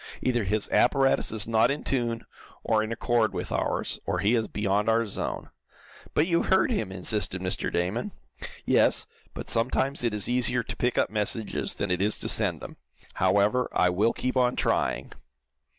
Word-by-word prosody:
Either 120 -4 +1
his 105 +2 0
apparatus 135 -1 +3
is 110 -1 -1
not 110 -1 +3
in 145 +2 -2
tune, 120 -3 -2 0.4
or 110 -1 +2
in 110 +1 -4
accord 115 -1 0
with - - -4
ours, - - -1
or 95 - 0
he 100 +6 +2
is 115 -3 +1
beyond 105 +1 0
our 115 +1 +2
zone." 100 - -5 0.6
"But 150 - +3
you 170 -1 +1
heard 190 +6 +2
him," 110 - -2
insisted 95 0 -1
Mr. 90 0 -2
Damon. 95 - -2 0.5
"Yes, - - +3 0.3
but - - -7
sometimes 130 +4 0
it 115 -3 0
is 105 - 0
easier 125 0 +1
to - - -6
pick 125 0 -1
up - - +1
messages 110 +1 -1
than 100 -2 -2
it 90 +1 0
is 105 +2 +1
to - - -3
send - - +1
them. - - -9 0.4
However, 100 +6 +2
I 90 - +3
will 105 +6 +2
keep 130 +1 -3
on 125 -1 +2
trying." - - -1
110 Hz, 180 wpm, -26 LUFS, 100-125 Hz, 0.6 s, apparatus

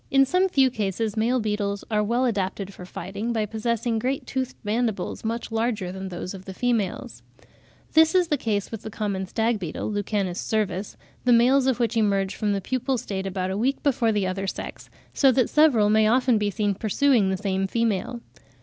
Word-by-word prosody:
In 270 0 +5
some 365 +7 +2
few 270 -6 +3
cases 215 -1 -2
male 235 +4 +1
beetles 210 -2 -2
are 210 -1 +2
well 240 +4 +1
adapted 200 -3 -2
for 180 - -10
fighting, 200 +5 -5
by 220 -2 0
possessing 225 +1 -1
great 260 +4 -2
toothed 260 -1 -3
mandibles, 220 -2 -2
much 230 +1 -3
larger 225 -5 -1
than 190 0 -6
those 180 +1 -6
of 190 -1 -10
the 190 - -8
females. 230 -6 -1 0.7
This 320 +3 +5
is 360 -2 +3
the 295 - +3
case 215 -6 -2
with 225 -2 -6
the - - -7
common 200 -3 -3
stag 225 +2 0
beetle 175 +3 -4
(Lucanus 200 -3 -2
cervus), 210 -2 -2 0.3
the 250 - +3
males 255 +3 +5
of 260 -2 +1
which 235 0 0
emerge 200 -3 +1
from 210 -2 -1
the 200 - -1
pupal 260 +4 -1
state 195 -3 -4
about 185 -1 -2
a 190 - -2
week 265 +5 0
before 260 -6 +2
the 205 -3 0
other 190 +1 -2
sex, - - -6 0.2
so 270 -2 +5
that 255 -1 +1
several 285 -9 +5
may 215 +1 +4
often 245 0 +3
be 210 -1 0
seen 205 -1 0
pursuing 220 +1 +2
the 190 - 0
same 195 -1 -1
female. 230 +2 -1
220 Hz, 195 wpm, -25 LUFS, 195-245 Hz, 0.7 s, In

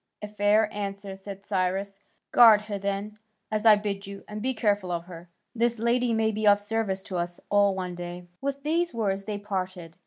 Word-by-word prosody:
"A - - -3
fair 210 +1 +3
answer," 200 -1 -5
said 195 0 -9
Cyrus. 195 +1 -1 0.3
"Guard 225 -3 +8
her 210 -1 -5
then, 200 +2 -3 0.3
as 215 +1 +1
I 215 - +9
bid 200 -1 -4
you, 200 0 -9
and 210 0 -6
be 260 +3 +1
careful 205 -4 +1
of 170 -1 -3
her. 175 -1 -11 0.2
This 235 0 +1
lady 235 +2 +1
may 220 -1 +2
be 215 0 -1
of 205 0 +6
service 205 -2 -2
to 185 - -5
us 175 0 -3
all 200 -1 +4
one 180 -1 -4
day." 175 0 -7 0.2
With 280 0 -3
these 335 -1 0
words 195 -3 -1
they 210 -1 -3
parted. 185 -4 -5
205 Hz, 195 wpm, -27 LUFS, 190-215 Hz, 0.3 s, I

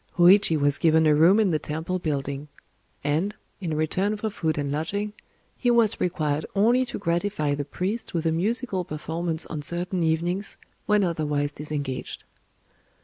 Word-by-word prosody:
Hōïchi 175 -2 +6
was 145 0 +2
given 160 -1 +4
a 155 - +5
room 170 +8 +5
in 205 -4 +3
the 155 - +1
temple 160 +5 -3
building; 140 -3 -3 0.6
and, 160 +9 0 0.2
in 170 -5 -3
return 190 +7 0
for 215 +1 -3
food 160 -6 -1
and 145 -1 -1
lodging, 200 +8 -2 0.4
he 245 - 0
was 235 -3 +3
required 155 -4 0
only 240 +6 +4
to - - -4
gratify 170 -4 0
the 145 0 -3
priest 190 +10 -3
with 165 -1 -2
a 165 - +3
musical 200 +3 0
performance 160 +1 -3
on 155 -2 -5
certain 175 +4 -1
evenings, 170 +5 -1 0.3
when 210 -1 +4
otherwise 150 -4 0
disengaged. 145 -3 -5
165 Hz, 155 wpm, -25 LUFS, 150-195 Hz, 0.6 s, Hōïchi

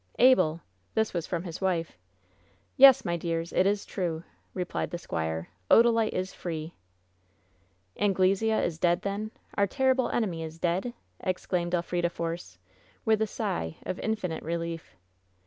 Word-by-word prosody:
"Abel!" 205 -11 +5 0.3
This 220 0 +1
was 170 -2 -2
from 170 -2 -2
his 170 -1 -7
wife. 175 - 0 0.8
"Yes, 270 -1 +8
my 170 0 0
dears, 165 0 -3
it 185 - +4
is 205 0 0
true 170 -4 -3
!" - - -39
replied 180 -2 -2
the 175 - -4
squire. 80 - -3 0.2
"Oda 235 +1 +7
lite 225 -1 +1
is 185 +1 -2
free 160 -1 -5 0.7
!" 95 - -39 0.4
"Anglesea 200 +2 +2
is 165 -2 -3
dead, 175 0 +2
then? 200 +2 -2 0.2
Our 200 0 +2
terrible 260 +3 +2
eijemy 180 -8 -1
is 160 0 -7
dead 180 +8 -1
!" - - -41
exclaimed 180 -1 -1
Elf 175 0 -3
rida 175 -1 +1
Force, 165 - -5 0.5
with 220 -1 +3
a 220 - +2
sigh 80 - -3
of 185 - -4
infinite 200 -7 -2
relief. 165 - -4
175 Hz, 160 wpm, -28 LUFS, 165-210 Hz, 0.8 s, Yes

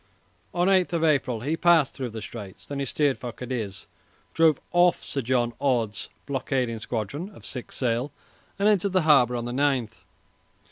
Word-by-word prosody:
On 175 +1 +1
8 190 -2 +3
April 145 -8 +1
he 150 +6 -1
passed 165 -4 +4
through 130 -3 -4
the 110 -1 -7
Straits. 100 -5 -9
Then 140 -1 -5
he 140 - -1
steered 140 +1 +1
for 125 - -5
Cadiz, 115 -5 -5 0.5
drove 160 -3 +4
off 175 0 +4
Sir 140 - -3
John 120 -1 +1
Orde's 120 -6 0 0.2
blockading 130 -4 -1
squadron 120 - -4
of - - -14
six 125 - -7
sail, 125 +2 0 0.5
and 200 +2 +2
entered 200 -2 +2
the 185 -3 +3
harbour 130 -6 +5
on 120 -1 -3
the 120 - -4
9th. 130 -5 0
130 Hz, 170 wpm, -26 LUFS, 120-160 Hz, 0.5 s, harbour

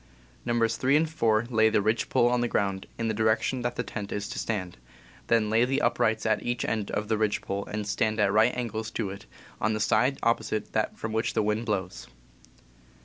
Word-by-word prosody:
Nos. 115 -1 +1
3 135 +2 +3
and 160 +2 +3
4 115 -8 +1
lay 110 -1 +4
the 110 - +2
ridge 110 +2 0
pole 120 - +3
on 120 0 +2
the 120 - +1
ground, 100 -4 -1
in 115 - -1
the 110 - 0
direction 110 +4 +1
that 120 0 -2
the 125 - -2
tent 105 -3 -6
is 105 0 -3
to - - -4
stand; 95 - -3 0.5
then 110 -2 +2
lay 115 +2 +4
the 135 +3 +1
up - - +1
rights 110 -1 +1
at 110 -1 +2
each 120 0 -2
end 110 -3 -2
of 105 +1 -3
ridge 110 -1 +1
pole 100 0 -4
and 105 -1 -4 0.3
at 100 -1 +3
right 110 +4 +4
angles 110 -2 -3
to 105 -4 -3
it, 100 - -10 0.3
on 110 +1 +1
the 110 - -2
side 125 +6 +2
opposite 110 -2 0
that 110 - -1
from 110 0 -4
which 110 0 0
the - - +2
wind 105 +2 -1
blows. 90 - -3
110 Hz, 215 wpm, -27 LUFS, 105-120 Hz, 0.5 s, lay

